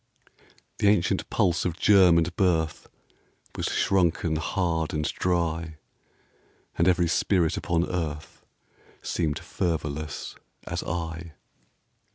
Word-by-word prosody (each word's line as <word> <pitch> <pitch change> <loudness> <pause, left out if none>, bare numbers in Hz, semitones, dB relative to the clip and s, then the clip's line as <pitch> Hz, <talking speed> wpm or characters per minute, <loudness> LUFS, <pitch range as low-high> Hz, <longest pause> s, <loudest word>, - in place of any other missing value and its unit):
The 105 - +3
ancient 100 -4 +2
pulse 85 -2 +1
of 85 -2 -2
germ 95 -5 +6
and 85 +1 0
birth 80 -5 0 0.7
Was - - -2
shrunken 85 -4 +1
hard 80 -2 -1
and 75 0 -1
dry, 85 -3 -1 1.0
And 85 - +2
every 90 -1 +3
spirit 85 0 +1
upon 85 0 0
earth 80 -3 -5 0.6
Seemed 75 -4 -1
fervorless 75 -3 -3 0.3
as - - -3
I. 80 0 -5
85 Hz, 105 wpm, -26 LUFS, 80-90 Hz, 1.0 s, germ